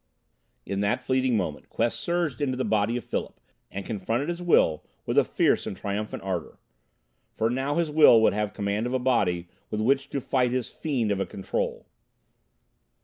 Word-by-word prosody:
In 100 - -3
that 100 0 +1
fleeting 130 -2 +1
moment 80 -7 -4
Quest 120 - -1
surged 170 -6 -1
into 130 -3 0
the 130 - -1
body 110 +2 +1
of 125 - -5
Philip - - -4 0.3
and 100 0 -6
confronted 115 - -2
his 175 0 -3
will 80 - +3 0.2
with - - -2
a - - +6
fierce - - +1
and 95 - -5
triumphant 105 +2 -4
ardor. 90 -4 -4 0.7
For 115 +1 -1
now 135 +3 -1
his 170 -3 0
will 150 -6 +7
would - - +4
have 105 -1 -1
command 100 +3 -1
of 125 - -2
a - - +4
body 100 -9 +1 0.2
with 105 - -3
which 135 +5 +1
to 140 - -2
fight 125 -1 +1
his 125 -1 -2
fiend 130 -9 -1
of 100 - 0
a 95 - -1
Control. 95 - -3
115 Hz, 185 wpm, -26 LUFS, 100-130 Hz, 0.7 s, will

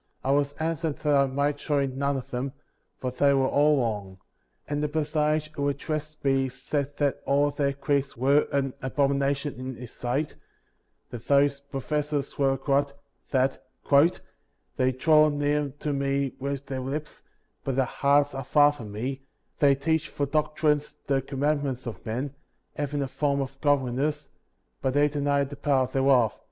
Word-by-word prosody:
19. 135 - +2
I - - +4
was 145 0 -2
answered 160 0 -2
that 150 -2 +3
I 140 0 +4
must 140 +2 0
join 140 -3 0
none 140 0 0
of 130 - -8
them, 130 +2 -3 0.5
for 125 - -2
they 140 +2 +3
were 135 -1 +3
all 145 +1 +4
wrong; 105 -5 -3 0.5
and 145 0 -2
the 150 - +1
personage 155 0 0
who 145 -2 -1
addressed 155 +1 -4
me 135 -1 +2
said 140 +2 -3
that 140 -2 0
all 145 +1 +2
their 140 -1 0
creeds 140 -1 -1
were 140 +4 +3
an 135 -2 0
abomination 140 +1 0
in 130 0 -5
his 120 -1 -9
sight; 130 +5 -2 0.8
that 120 -1 -8
those 140 0 +4
professors 145 +1 -3
were 135 -1 +4
all 135 - +1
corrupt; 140 +1 0 0.3
that 130 0 +1 1.1
"they 130 0 +2
draw 155 +4 +5
near 145 0 0
to 150 - -1
me 140 -1 0
with 140 0 -3
their 135 -1 -4
lips, 145 +4 -5 0.4
but 135 - -2
their 135 0 +3
hearts 140 +3 +2
are 135 0 -4
far 145 +3 +5
from 115 -8 -9
me; 130 +6 -4 0.4
they 140 -2 +5
teach 160 +3 0
for 145 - -1
doctrines 150 0 0
the 135 -1 +1
commandments 140 -1 -1
of 110 -6 -7
men, 130 +5 -3 0.4
hav 145 -1 -3
ing 145 - 0
a - - -3
form 140 +1 0
of 135 0 -5
godliness, 145 +1 0 0.5
but 130 0 0
they 145 +1 +5
deny 145 -1 +1
the 140 +1 -6
power 135 -3 +2
thereof. 130 -3 +3
140 Hz, 170 wpm, -27 LUFS, 135-145 Hz, 1.1 s, draw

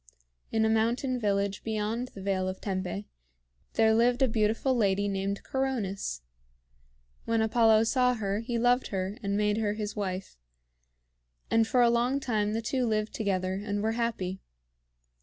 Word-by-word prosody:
In 220 0 +2
a - - +3
mountain 235 +4 +1
village 200 -2 0
beyond 220 +2 -2
the 195 - -8
Vale 190 -1 0
of 185 0 -4
Tempe, 195 +1 -3 0.7
there 220 0 +4
lived 240 +3 +3
a - - +5
beautiful 225 +3 +1
lady 200 -3 +2
named 195 0 -2
Coronis. 210 - -2 1.0
When 230 0 +1
Apollo 220 0 +4
saw 250 +2 +2
her, 200 -2 -2
he 235 +1 -3
loved 245 +2 +2
her 190 +1 -3
and 200 -1 -1
made 210 0 +1
her 210 -2 0
his 210 -1 -4
wife; 190 - -4 1.1
and 225 -1 +4
for 245 +1 +4
a 235 - +5
long 245 +3 +1
time 215 -5 0
the 225 +1 -2
two 250 +2 0
lived 215 -1 -1
together, 190 -2 -1
and 205 -1 -2
were 220 - +1
happy. 225 -5 -2
220 Hz, 160 wpm, -29 LUFS, 200-235 Hz, 1.1 s, a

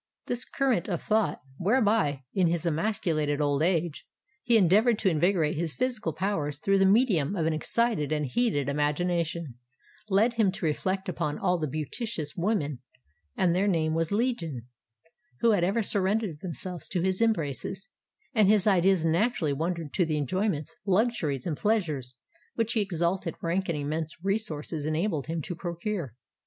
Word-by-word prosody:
This 245 -1 -2
current 260 -11 0
of 175 -4 -1
thought, 215 -6 0 0.2
whereby, 205 - +2
in 185 -3 +3
his 170 0 -1
emasculated 160 -4 0
old 145 -1 +1
age, 170 -2 0 0.3
he 235 -2 +4
endeavoured 210 +4 +4
to 205 - +2
invigorate 165 -1 +2
his 165 -1 -1
physical 245 -9 -1
powers 155 -4 -2
through 195 +6 +2
the 195 - +5
medium 200 - +3
of 165 -4 0
an 160 - +1
excited 155 -1 0
and 150 -1 0
heated 145 - 0
imagination, 155 -1 -1 0.5
led 210 +5 +3
him 220 -5 +2
to 195 -2 -4
reflect 190 +6 -1
upon 150 -4 -2
all 180 -2 +1
the 155 - -1
beauteous 155 - -4
women—and 140 - -2
their 195 +3 +2
name 160 -5 +1
was 165 +2 0
Legion—who 165 - -3
had 200 -5 +2
ever 200 +6 +1
surrendered 200 -4 0
themselves 180 0 -6
to 180 - -1
his 190 +2 0
embraces; 190 - -1 0.5
and 215 -5 +4
his 210 -2 +4
ideas 190 -3 +3
naturally 170 -2 +1
wandered 165 +1 -3
to 180 - +2
the 155 -2 -1
enjoyments, 170 - -1
luxuries, 190 - 0
and 155 -4 -2
pleasures 155 - -1 0.4
which 230 0 0
his 220 - +2
exalted 175 -2 -1
rank 180 +3 -1
and 165 - 0
immense 155 +2 -3
resources 165 -7 -2
enabled 155 -2 -1
him 165 -1 -3
to 175 - -4
procure. 175 - -4
175 Hz, 155 wpm, -28 LUFS, 155-205 Hz, 0.5 s, the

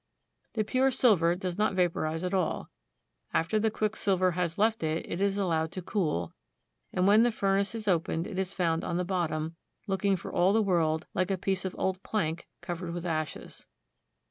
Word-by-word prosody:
The 220 - +1
pure 255 +5 +2
silver 205 -10 +4
does 180 0 -4
not 210 -2 +2
vaporize 165 -2 0
at 180 +1 -2
all. 185 -4 -1 0.6
After 175 +7 +2
the 220 +1 +2
quicksilver 200 -4 +1
has 170 -1 -2
left 220 +2 +2
it, 160 +1 -1
it 175 - -3
is 200 0 +2
allowed 165 -5 0
to 185 - -5
cool; 155 - -1 0.6
and 180 - +1
when 205 +3 +6
the 240 +1 +4
furnace 200 0 +1
is 220 -2 -5
opened, 165 -2 +1
it 190 -2 -4
is 190 -1 -1
found 165 -4 0
on 170 - -1
the 180 - 0
bottom, 165 -3 -2 0.3
looking 195 -1 +1
for 175 - -7
all 185 +3 +4
the 220 0 +4
world 160 -5 +1
like 185 +1 0
a 195 - +1
piece 190 0 -1
of 190 - -3
old 190 0 -1
plank 170 -7 -2
covered 175 0 -4
with 175 0 -5
ashes. 155 -3 -4
185 Hz, 190 wpm, -29 LUFS, 165-200 Hz, 0.6 s, when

